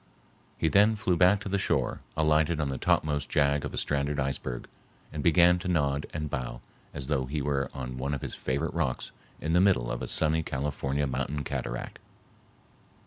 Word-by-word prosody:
He 80 - +1
then 105 +6 +5
flew 100 -4 +1
back 95 +3 +4
to 105 - -6
the 100 0 0
shore, 75 -10 0 0.2
alighted 80 +1 +3
on 75 -3 0
the 65 - -3
topmost 75 -2 +1
jag 70 -1 +2
of - - -4
a - - -7
stranded 70 0 0
iceberg, 65 -2 -3 0.5
and 75 - -3
began 85 +2 +5
to 90 - -5
nod 70 -5 +1
and 75 -2 -3
bow 65 -4 -4 0.3
as 70 -2 -6
though 65 -2 0
he 75 +3 -2
were 70 -1 -1
on 65 -2 -6
one 70 +2 -1
of 70 - -6
his - - -4
favorite 70 +5 -2
rocks 75 -7 -2 0.3
in 80 +1 -2
the 90 - +5
middle 90 -12 +3
of 65 - -3
a - - -3
sunny 80 +1 +2
California 70 -1 -2
mountain 70 +2 -2
cataract. - - -4
75 Hz, 190 wpm, -28 LUFS, 70-80 Hz, 0.5 s, then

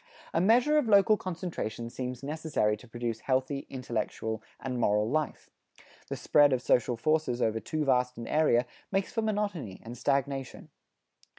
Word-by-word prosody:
A 165 - +2
measure 245 +10 +5
of 275 - -1
local 205 0 +6
concentration 165 - -5
seems 125 0 -5
necessary 150 -8 0
to 115 +4 -15
produce 115 -1 -3
healthy, 130 +2 -1
intellectual 110 -3 -3 0.2
and 125 -2 -3
moral 105 -1 +2
life. 155 +4 -2 0.6
The - - -3
spread 145 -2 +4
of 125 - 0
social 120 0 +2
forces 155 -2 +1
over 110 -2 +1
too 155 +5 -2
vast 125 -2 +2
an 115 - -6
area 150 -6 +3 0.3
makes 195 -1 -1
for 225 - 0
monotony 205 - -2
and 115 +2 -8
stagnation. 135 0 -2
130 Hz, 155 wpm, -29 LUFS, 120-160 Hz, 0.6 s, local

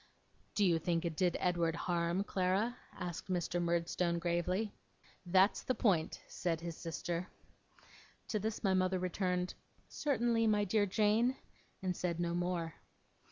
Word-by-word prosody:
'Do 205 - +4
you 170 -3 +4
think 165 +1 0
it 165 -2 -2
did 180 +1 +2
Edward 170 -2 +1
harm, 170 +2 0
Clara?' 195 +5 +1 0.2
asked 180 -1 -5
Mr. 175 -1 0
Murdstone, 170 0 +1
gravely. 175 +5 0 0.6
'That's 190 +3 +4
the 255 - -1
point,' 180 -8 +1
said 165 -2 -1
his 170 -1 -5
sister. 170 +1 -3 1.0
To 215 - 0
this 215 +2 -3
my 195 -2 +3
mother 185 0 +2
returned, 180 0 -1 0.3
'Certainly, 235 -5 +1
my 210 -1 +3
dear 205 +1 +2
Jane,' 220 +5 +3 0.5
and 185 -1 0
said 170 -1 -2
no 170 -1 0
more. 175 -2 -1
180 Hz, 140 wpm, -35 LUFS, 170-205 Hz, 1.0 s, Do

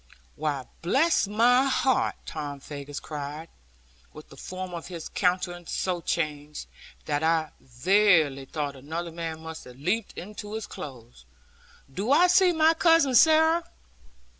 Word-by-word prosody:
'Why, 145 -4 -2 0.2
bless 270 - +2
my 240 +5 +4
heart!' 265 -1 +1
Tom 145 -2 -6
Faggus 140 0 -7
cried, 150 +2 -7 0.6
with - - -13
the - - -14
form 185 0 -7
of 170 -1 -6
his 170 -3 -7
countenance 180 -2 -1
so 180 -2 -1
changed, 150 -3 -3 0.4
that 145 -1 -1
I 160 -1 +1
verily 150 - +2
thought 145 0 -4
another 160 +6 -5
man 165 -1 -5
must 160 0 -8
have 125 0 -13
leaped 190 +10 -2
into 210 +2 -8
his 220 - -4
clothes 125 - -10 0.7
'do 205 - -2
I 325 +5 +6
see 360 0 +5
my 320 -1 +4
Cousin 330 -5 +4
Sarah? 320 +4 +5
170 Hz, 140 wpm, -26 LUFS, 150-225 Hz, 0.7 s, I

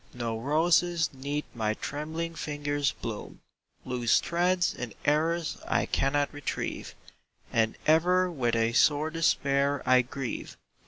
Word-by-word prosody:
No 115 -2 -2
roses 165 +4 +2
'neath 140 +3 -3
my 110 -2 -1
trembling 160 +5 -4
fingers 145 -2 -1
bloom, 110 -3 -7 0.4
Loose 125 -2 +2
threads 180 +1 +1
and 120 -4 -6
errors 160 +3 +1
I - - +1
cannot 145 +1 0
retrieve, 145 -1 -4 0.6
And 110 -1 +1
ever 180 +3 +3
with 120 -7 0
a 115 0 +1
sore 150 +4 +3
despair 140 -3 +1
I 130 0 +5
grieve. 125 0 -6
145 Hz, 120 wpm, -28 LUFS, 125-165 Hz, 0.6 s, I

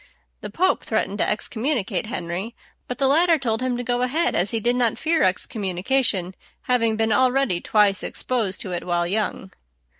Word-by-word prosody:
The - - -7
Pope 370 +2 +1
threatened 200 +1 -2
to - - +2
excommunicate 225 0 -1
Henry; 190 0 -5 0.3
but 250 - -4
the 275 - +2
latter 330 +4 +4
told 230 -4 -1
him 255 -1 -1
to 245 - -4
go 245 0 -1
ahead, 305 +8 +1
as 180 +3 +2
he 225 - +1
did 240 +3 +1
not 240 -3 +1
fear 320 +1 +1
excommunication, 190 +1 0 0.3
having 230 -3 +1
been 220 0 0
already 255 -6 +2
twice 210 -2 +2
exposed 225 -7 -2
to 185 - -5
it 175 - -3
while 175 -1 0
young. 195 0 -3
225 Hz, 175 wpm, -23 LUFS, 195-255 Hz, 0.3 s, latter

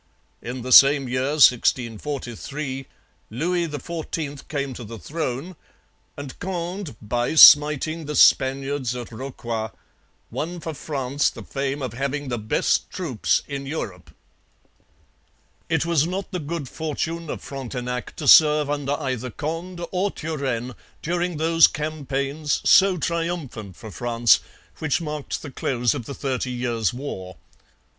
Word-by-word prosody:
In 125 0 -6
the 130 - -5
same 140 +1 +8
year 130 +3 -1
(1643) 130 +1 +1 0.4
Louis 170 +9 -1
XIV 150 -1 -5
came 140 -3 -3
to 120 - -8
the 115 +1 -8
throne; 150 - -4 0.6
and 145 -2 -8
Conde, 180 - -4
by 120 +7 -1
smiting 150 +1 +7
the 150 - -3
Spaniards 135 -1 +3
at 120 -1 -7
Rocroi, 115 -2 -5 0.6
won 175 +3 -4
for 160 -1 -5
France 140 -1 -1
the - - -10
fame 140 0 -3
of 130 - -4
having 140 +2 -3
the 120 -2 -2
best 110 0 0
troops 160 - 0
in 140 -1 -5
Europe. 90 - -5 1.6
It - - +1
was 165 -2 +2
not 190 +4 -4
the 180 - -2
good 155 -2 -4
fortune 160 +2 -4
of - - -5
Frontenac 125 -2 -5
to - - -5
serve 150 -2 +7
under 145 -1 -1
either 130 -4 -3
Conde 170 +6 -5
or 190 +2 0
Turenne 135 -8 -3 0.3
during 175 0 -1
those 165 +1 +6
campaigns, 150 -1 -2
so 190 -1 +6
triumphant 165 - -3
for 110 +1 -10
France, 120 0 +3 0.4
which 155 -1 0
marked 150 -3 -5
the 145 - -7
close 125 -2 0
of 130 -6 -5
the 140 - -6
Thirty 130 -2 -2
Years' 120 -4 -1
War. 95 -9 -7
140 Hz, 135 wpm, -23 LUFS, 125-160 Hz, 1.6 s, same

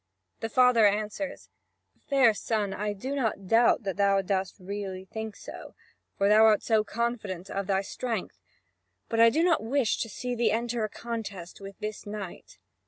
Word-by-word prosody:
The 225 - -3
father 250 -3 +5
answers: 215 +7 -3 0.6
"Fair 265 -5 +5
son, 210 -2 -1
I 210 +1 -2
do 255 +8 -5
not 225 -7 -1
doubt 230 +2 +4
that 195 -2 -3
thou 200 -1 +3
dost 190 0 -1
really 190 -1 -6
think 220 +2 -6
so, - - -10 0.4
for 200 - +2
thou 215 +2 +6
art 215 -2 +4
so 220 -2 +3
confident 215 -6 -3
of 195 -1 -3
thy 195 -1 +1
strength. 225 -1 -4 0.7
But 225 - -1
I 230 0 +8
do 315 +8 +1
not 345 -2 +3
wish 240 +1 +1
to 225 - -2
see 250 +4 -4
thee 235 -1 +2
enter 235 0 -1
a 215 - -1
contest 205 -7 -6
with 195 0 -9
this 215 0 -6
knight." 200 - -8
215 Hz, 170 wpm, -28 LUFS, 195-235 Hz, 0.7 s, I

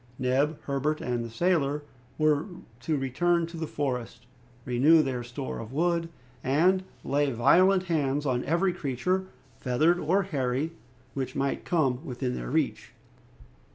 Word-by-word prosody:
Neb, 135 +4 +1
Herbert, 140 +2 -1
and 120 -1 -2
the 115 - -6
sailor 150 +1 +1 0.3
were 155 +1 +2 0.3
to 155 +5 -1
return 170 +6 +1
to 170 +1 -10
the 160 -1 -4
forest, 130 -6 -3 0.4
renew 145 +6 +5
their 130 -3 -3
store 125 +3 -5
of 115 0 -8
wood, 165 +3 0 0.3
and 170 +8 +3 0.2
lay 145 +1 +1
violent 180 +10 +4
hands 150 -5 0
on 125 -2 0
every 175 +5 +2
creature, 175 +5 -1 0.3
feathered 155 +8 +2
or 185 +6 +2
hairy, 140 -3 -1 0.4
which 135 -2 -4
might 135 0 -1
come 135 -6 +1
within 125 -3 -3
their - - -5
reach. - - -1
145 Hz, 140 wpm, -28 LUFS, 130-170 Hz, 0.4 s, renew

